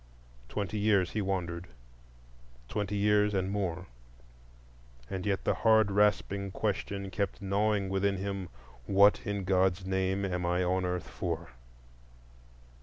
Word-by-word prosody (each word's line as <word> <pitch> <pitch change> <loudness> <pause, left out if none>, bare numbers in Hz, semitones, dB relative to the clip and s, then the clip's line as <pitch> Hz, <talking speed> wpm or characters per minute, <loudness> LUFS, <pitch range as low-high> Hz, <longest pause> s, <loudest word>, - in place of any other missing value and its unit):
Twenty 105 0 -3
years 100 -4 +3
he 110 - -1
wandered,—twenty - - -6
years 105 0 +3
and 95 0 0
more; 90 -3 -2 1.3
and 95 +1 -3
yet 100 -2 0
the - - +2
hard 110 -2 +4
rasping 100 -1 +2
question 100 -1 -3
kept 100 +1 -2
gnawing 100 0 +1
within 95 +1 0
him, 95 -1 -4 0.4
"What, 100 +1 +5
in 100 -1 -2
God's 95 0 +2
name, 95 +1 0
am 90 -2 -2
I 90 +1 +1
on 90 +1 +1
earth 90 -1 -2
for?" - - -4
95 Hz, 120 wpm, -30 LUFS, 90-100 Hz, 1.3 s, What